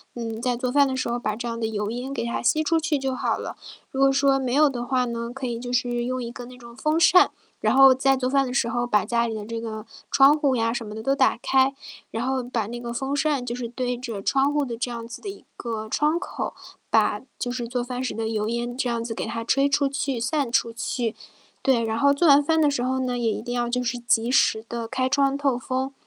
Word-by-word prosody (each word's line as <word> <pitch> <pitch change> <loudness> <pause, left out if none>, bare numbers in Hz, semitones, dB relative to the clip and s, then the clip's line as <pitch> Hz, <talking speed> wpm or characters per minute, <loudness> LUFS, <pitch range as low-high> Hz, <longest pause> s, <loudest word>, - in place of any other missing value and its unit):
嗯， 225 -1 -5
在 245 -1 0
做 250 0 -2
饭 280 +2 +4
的 260 -1 -2
时 255 - -1
候 240 +1 -1
把 215 -3 -3
这 240 - -4
样 230 0 -3
的 225 - -2
油 210 -1 -2
烟 255 +3 -4
给 235 - -2
它 235 - -2
吸 310 +6 +2
出 325 +1 +2
去 315 -3 0
就 265 -1 -2
好 - - 0
了。 - - -6 0.3
如 270 - -3
果 275 0 +6
说 275 0 +3
没 260 -2 -2
有 300 0 +5
的 240 -2 -4
话 255 -1 +1
呢， 235 0 -4
可 270 -2 -4
以 235 -1 -3
就 245 0 -5
是 245 -1 0
用 255 +1 -2
一 235 - -4
个 245 +1 -8
那 250 0 -12
种 235 -1 -13
风 305 +4 0
扇， 360 +2 +6 0.3
然 - - +2
后 270 -1 +8
在 270 0 +2
做 255 0 -1
饭 275 0 +3
的 250 - -4
时 250 -3 +1
候 240 +1 -1
把 210 -4 +2
家 235 +1 +1
里 225 - -3
的 210 -1 -5
这 230 0 -5
个 220 -2 -6 0.3
窗 275 +2 +6
户 280 -4 +2
呀 230 0 +1
什 235 -2 -4
么 210 - -8
的 220 - -6
都 270 +4 +1
打 265 -4 +3
开。 265 +1 +3 0.4
然 225 +3 -2
后 265 -1 0
把 235 -4 -2
那 240 +1 -6
个 235 -1 -5
风 270 +3 -2
扇 285 -3 0
就 240 0 -3
是 245 -2 -4
对 245 0 -2
着 230 -5 -6
窗 275 +6 +2
户 295 -1 +1
的 235 -2 -4
这 250 0 -2
样 230 -1 -6
子 - - -9
的 405 - -5
一 395 - -10
个 220 -2 -5
窗 305 +6 +1
口， 375 - -5 0.4
把 - - +2 0.2
就 245 - -2
是 245 -2 -4
做 245 0 -2
饭 250 +1 -4
时 255 - -2
的 225 0 -3
油 215 -1 -1
烟 240 +1 -3
这 250 -2 0
样 230 -1 -1
子 230 -1 -4
给 - - -4
它 230 0 -4
吹 275 +4 +2
出 280 0 +2
去、 275 -2 -2
散 270 0 -1
出 230 -1 +1
去。 230 0 -2 0.5
对， 255 -3 +3
然 225 0 -1
后 280 +2 +4
做 330 +4 +2
完 285 0 +7
饭 320 +2 +2
的 295 - +4
时 250 -4 -1
候 260 +1 0
呢， 250 -1 -1
也 230 -2 +1
一 - - -3
定 245 0 -4
要 240 0 0
就 250 +1 0
是 245 0 -2
及 235 0 +1
时 220 -3 +3
地 235 -1 -4
开 260 +2 -1
窗 275 0 +2
透 275 -4 +1
风。 260 +2 -3
250 Hz, 295 characters per minute, -24 LUFS, 235-270 Hz, 0.5 s, 后